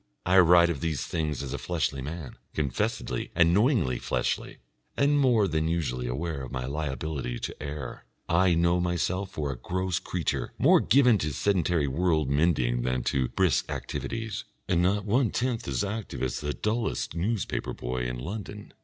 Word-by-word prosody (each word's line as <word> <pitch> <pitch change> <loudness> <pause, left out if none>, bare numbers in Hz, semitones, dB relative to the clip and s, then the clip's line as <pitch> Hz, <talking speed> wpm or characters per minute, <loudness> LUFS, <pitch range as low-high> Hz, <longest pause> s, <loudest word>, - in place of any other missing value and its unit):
I 95 +2 +5
write 85 -1 +6
of 70 -5 -5
these 80 -5 -1
things 75 -5 -2
as 65 - -5
a - - -3
fleshly 80 -6 -1
man, 75 0 -6 0.2
confessedly 70 -5 -1
and 85 0 +5
knowingly 105 - +2
fleshly, - - -2 0.4
and 145 +1 +3
more 120 -7 +4
than 80 -2 0
usually 70 -7 -1
aware 70 +4 -3
of 65 -2 -7
my 65 -1 -3
liability 70 -2 -3
to - - -5
err; 70 -3 -6 0.2
I 90 +1 +3
know 85 +1 +3
myself 90 +2 -1
for 75 -2 -3
a - - -4
gross 95 +5 -1
creature - - -2
more - - +6
given 125 -6 +4
to 75 - -1
sedentary 85 -3 +1
world 80 -1 +1
mending 70 -6 +2
than 65 0 -1
to 65 -2 +1
brisk - - +1
activities, 115 -3 -4 0.2
and 85 -2 +2
not 100 +3 +1
one 115 +3 +2
tenth 120 -2 -1
as 65 -3 0
active 100 - -4
as 65 -2 -1
the 75 -1 -2
dullest 110 +3 -2
newspaper 95 +5 -2
boy 60 0 -3
in 60 0 -4
London. 100 - -7
85 Hz, 170 wpm, -28 LUFS, 70-95 Hz, 0.4 s, write